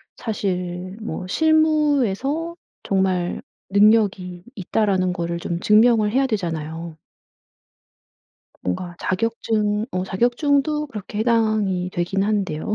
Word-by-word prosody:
사실 185 -3 -3
뭐 215 - -5
'실무에서 305 - +1 0.3
정말 190 -2 0 0.3
능력이 200 -4 +3
있다.'라는 190 -1 0
거를 170 -1 -3
좀 170 0 -3
증명을 215 0 +4
해야 270 +3 +2
되잖아요. 165 -6 -4 1.7
뭔가 175 - -3
자격증 215 0 -1
어 185 0 -2
자격증도 285 +9 +1
그렇게 210 -3 -7
해당이 215 -5 +1
되긴 180 +3 -1
한데요. 200 -4 -1
205 Hz, 230 characters per minute, -22 LUFS, 180-230 Hz, 1.7 s, 증명을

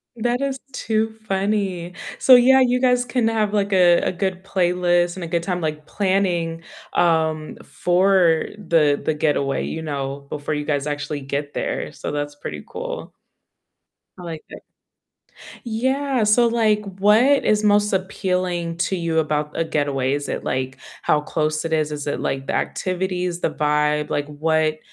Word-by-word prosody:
That 240 +2 -1
is 275 -1 -1 0.2
too 220 -3 -1 0.2
funny, 195 -3 -1 0.2
so, 260 - +6
yeah, 255 +2 +7
you 250 -1 +2
guys 250 -1 +3
can 245 -3 0
have 215 -2 0
like 205 -1 0
a 180 -2 +5
a - - 0
good 185 +1 -3
playlist, 175 -2 +1
and 185 - -6
a 170 - -4
good 170 0 -1
time 180 -1 -2
like 155 -1 -3
planning, 180 -4 0 0.3
um, 160 -2 +1
for 180 -2 +2
the 165 -7 +2
the 155 - +1
getaway, 145 -3 0
you 160 - -5
know, 140 -2 -4
before 150 +1 -3
you 150 - -3
guys 145 -1 -1
actually 145 0 -3
get 140 +1 -4
there, - - -3
so - - -6
that's 145 0 -3
pretty 145 - -7
cool. - - -6 1.1
I - - -9
like 165 -2 -7
that. - - -10 1.0
Yeah, 260 +2 0
so, 215 +3 +4
like, 220 -2 +2 0.2
what 225 +8 +4
is 215 0 +2
most 205 0 +3
appealing 180 -3 -1
to 190 - 0
you 165 -2 0
about 150 -1 -1
a 165 - +2
getaway? 140 -4 0
Is 145 0 -3
it - - -3
like 130 0 -2 0.2
how 150 - +2
close 155 +1 -1
it 160 - -2
is, 155 -1 +1
is 145 -1 -5
it 145 - -2
like 135 0 -3
the - - -2
activities, 180 -1 -2
the - - +1
vibe? 150 0 0
Like 145 0 -1
what 155 +1 0
175 Hz, 165 wpm, -22 LUFS, 150-205 Hz, 1.1 s, yeah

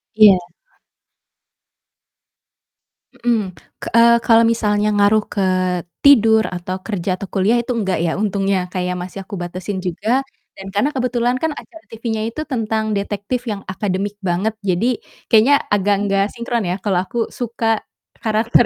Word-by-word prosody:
Iya. 210 -4 +8 2.8
Hmm, 220 -6 -1 0.2
ke - - -7
eee, 235 0 +7
kalo 230 0 +4
misalnya 210 -2 +1
ngaruh 205 +1 +3
ke 200 - -1 0.6
tidur, 225 -6 +6
atau 180 +1 -4
kerja, 185 -3 -2
atau 195 - -7
kuliah 200 +5 +2
itu 240 - -5
nggak, 210 -6 -1
ya. 165 - +1
Untungnya 195 -3 0
kayak 180 -1 -1
masih 185 +2 -7
aku 195 0 -7
batesin 185 +2 -4
juga 200 +8 0 0.4
dan 195 - -9
karena 210 +8 +2
kebetulan 250 -2 0
acara 320 +2 -5
TV-nya 225 -1 -4
itu 310 - -4
tentang 220 -4 -1
detektif 205 +5 -3
yang 210 -3 -3
akademik 195 +1 -2
banget 190 +5 0
jadi 215 +7 +1 0.3
kayaknya 240 +6 +5
agak 205 0 +2
nggak 195 0 +2
sinkron, 235 -3 -2
ya, 175 - -1
kalau 195 -4 0
aku 230 +3 -2
suka 230 -2 -1 0.4
karakter 225 +2 +2
215 Hz, 140 wpm, -19 LUFS, 195-235 Hz, 2.8 s, Iya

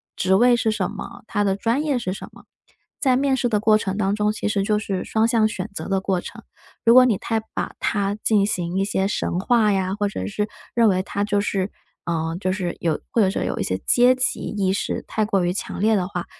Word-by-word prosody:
职 190 +1 +2
位 245 +4 +5
是 230 -1 0
什 210 -4 -1
么， - - -9
他 205 -1 -1
的 195 -1 +1
专 230 +8 0
业 290 -4 0
是 185 -6 -3
什 - - -9
么， - - -17 0.5
在 260 -3 +3
面 270 +1 +2
试 245 -1 0
的 210 -3 +1
过 215 0 +4
程 195 -1 -3
当 200 -1 +1
中 210 0 +1
其 215 - -3
实 210 -1 0
就 210 +1 +1
是 195 -3 -3
双 220 0 +1
向 230 -2 +3
选 210 -1 -5
择 - - -6
的 195 0 +1
过 190 -2 0
程， - - -10 0.4
如 230 - +7
果 255 +1 +9
你 225 -6 +2
太 225 +3 -1
把 - - -3
它 200 -1 0
进 210 -3 +3
行 180 -3 -2
一 195 - +1
些 195 -1 0
神 180 -3 -2
化 220 +1 +3
呀， 190 -1 0
或 205 0 0
者 95 - -4
是， 210 - -2 0.3
认 230 -1 +5
为 185 -1 +2
他 200 +1 -2
就 205 0 +1
是 195 -1 -1 0.7
就 185 - 0
是 185 -2 -3
有 165 -2 0
或 230 - +3
者 195 - +4
说 - - -2
有 - - -2
一 - - 0
些 95 - -1
阶 245 +1 +5
级 255 0 0
意 195 -3 -1
识 195 - -2
太 215 - 0
过 195 -3 +1
于 175 - 0
强 - - -5
烈 220 +1 +4
的 185 -3 0
话， 180 -3 -4
205 Hz, 265 characters per minute, -22 LUFS, 190-225 Hz, 0.7 s, 果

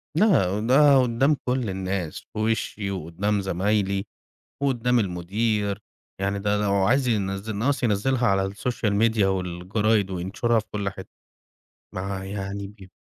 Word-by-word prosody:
لأ، 105 - +3
ده 135 +4 +5
قُدّام 130 +5 +2
كل 125 -3 0
الناس. 95 -3 -3
في - - -5
وِشِّي 110 -2 -1
وقُدّام 95 +3 -1
زمايلي 100 +1 0 0.6
وقُدّام 125 -3 +2
المدير. 100 +2 -1 0.4
يعني 100 +1 0
ده 105 +1 0
لو 100 -1 +1
عايز 120 +7 +2
ينزّل 100 -1 -1
ناقص 135 +7 0
ينزّلها 120 +3 +1
على 95 -3 +2
السوشيال 105 +2 -2
ميديا 110 -1 +3
والجرايد 95 +3 0
وينشرها 95 +6 0
في 110 - -4
كل 100 -1 -1
حت 95 0 -10 0.9
مع 95 +1 -4
يعني 100 0 -5
ب 100 -1 -14
100 Hz, 135 wpm, -24 LUFS, 95-115 Hz, 0.9 s, ده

